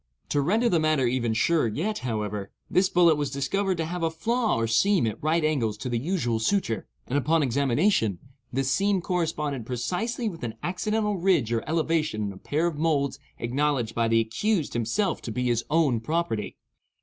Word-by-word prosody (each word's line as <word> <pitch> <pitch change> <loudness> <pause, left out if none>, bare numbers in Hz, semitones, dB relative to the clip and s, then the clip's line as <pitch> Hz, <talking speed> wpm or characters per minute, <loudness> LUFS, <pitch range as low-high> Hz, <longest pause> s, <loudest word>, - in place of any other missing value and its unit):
To 145 - +2
render 215 - +2
the 175 -8 +3
matter 155 -4 +2
even 120 -2 0
surer 155 +3 +2
yet, 180 - -2
however, 105 -4 -3 0.2
this 185 +1 +3
bullet 170 -3 +4
was 145 -2 -1
discovered 185 +8 -1
to 165 - -1
have 175 +2 -4
a 165 - +2
flaw 225 +8 0
or 115 - 0
seam 165 - +3
at 110 - -3
right 155 +1 +1
angles 120 -9 0
to 125 - -5
the 120 -1 0
usual 125 -7 -1
suture, 115 - 0 0.2
and 140 +3 0
upon 155 +4 +2
examination, 135 - +2 0.3
this 135 +1 0
seam 200 +2 +2
corresponded 155 -7 -2
precisely 180 - -2
with 175 -6 -5
an 115 -2 -4
accidental 210 +3 -1
ridge 170 - +2
or 115 - 0
elevation 160 -8 0
in 100 -1 -3
a - - -12
pair 150 - -1
of 165 -4 -2
moulds 145 -4 +1 0.2
acknowledged 125 -1 0
by 115 -1 +1
the 115 0 +3
accused 150 - 0
himself 120 - 0
to 115 - -5
be 125 +3 -2
his 120 -1 +1
own 150 -7 +3
property. 115 -4 -2
150 Hz, 185 wpm, -26 LUFS, 120-175 Hz, 0.3 s, bullet